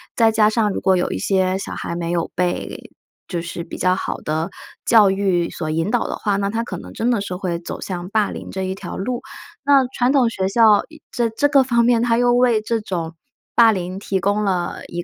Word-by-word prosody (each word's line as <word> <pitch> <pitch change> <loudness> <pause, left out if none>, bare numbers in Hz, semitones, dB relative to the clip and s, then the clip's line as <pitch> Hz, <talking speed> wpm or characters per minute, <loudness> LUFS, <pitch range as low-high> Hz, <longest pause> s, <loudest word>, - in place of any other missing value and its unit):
再 225 -1 +4
加 215 -1 +4
上 220 -1 +1
如 - - -3
果 190 -1 +3
有 175 - 0
一 - - -2
些 185 - +1
小 195 - -6
孩 - - -5
没 170 0 -3
有 170 -1 -1
被 180 0 -3 0.4
就 175 -3 -3
是 170 0 -5
比 165 - -9
较 185 0 +2
好 - - -3
的 160 +3 -2 0.4
教 215 -4 +6
育 190 -3 0
所 155 -2 -4
引 165 +5 -1
导 245 - +1
的 - - -3
话， 200 -2 -1
那 200 0 -1
他 225 +2 -2
可 - - -6
能 - - -11
真 235 +2 0
的 230 -4 +1
是 190 -2 -4
会 180 -2 -3
走 170 - -7
向 180 -1 -5
霸 210 -1 +1
凌 - - -8
这 190 - -4
一 190 0 -2
条 190 -2 -7
路， 245 +5 -3 0.4
那 275 -1 +5
传 245 +1 +2
统 270 -4 +4
学 190 -4 -1
校 215 0 +5
以 315 -1 -15
这 235 -2 0
这 225 +6 +1
个 280 -2 +4
方 235 -2 +2
面 235 -1 +3
它 230 -1 +2
又 245 0 +3
为 245 -2 +3
这 225 +1 -1
种 170 -5 -4 0.4
霸 230 -1 +6
凌 185 -1 -4
提 195 -1 -2
供 205 +3 0
了 185 -3 -1
一 175 0 -5
200 Hz, 255 characters per minute, -20 LUFS, 180-230 Hz, 0.4 s, 教